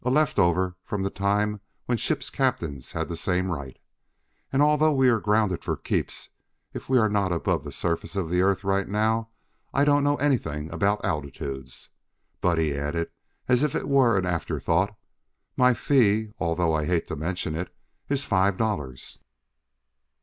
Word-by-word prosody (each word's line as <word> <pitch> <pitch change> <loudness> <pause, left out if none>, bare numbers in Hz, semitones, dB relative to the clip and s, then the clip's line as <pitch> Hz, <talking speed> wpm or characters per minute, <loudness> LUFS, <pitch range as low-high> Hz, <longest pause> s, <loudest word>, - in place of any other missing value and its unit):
A 125 - 0
left 150 -2 +2
over 90 0 +2
from 100 -2 -3
the 95 - -1
time 105 +1 0 0.2
when 125 - +1
ship's 150 +5 -1
captains 85 - -2
had - - -2
the 85 - -4
same 90 +2 0
right. 70 -5 -6 0.7
And 135 +2 +3
although 150 +1 +4
we 135 -3 +4
are 115 -2 +3
grounded 105 -3 +1
for - - -2
keeps, - - -3 0.4
if - - -8
we 130 - +4
are 110 -3 +4
not 100 -3 0
above 85 - 0
the - - -7
surface 85 +3 -2
of 95 -4 -1
the 90 0 +3
Earth 95 0 +2
right 100 0 +1
now 110 +2 0 0.5
I 140 - +4
don't 145 -1 +4
know 145 0 +3
anything 80 - -1
about 100 +5 +1
altitudes. 70 -2 -5 0.5
But," 85 -2 +2
he 80 -3 +1
added 75 +4 -2 0.4
as 125 0 +3
if 150 -2 +1
it - - -2
were 130 -6 +4
an 95 - 0
afterthought, 90 +2 0 0.6
"my 125 -1 +4
fee, 110 -4 +2
although 85 0 +1
I 75 -1 0
hate 85 -2 +1
to - - -3
mention 85 +2 -2
it, 85 +3 -4 0.4
is 140 0 0
five 95 -1 +2
dollars." 75 - -3
100 Hz, 170 wpm, -26 LUFS, 85-120 Hz, 0.7 s, although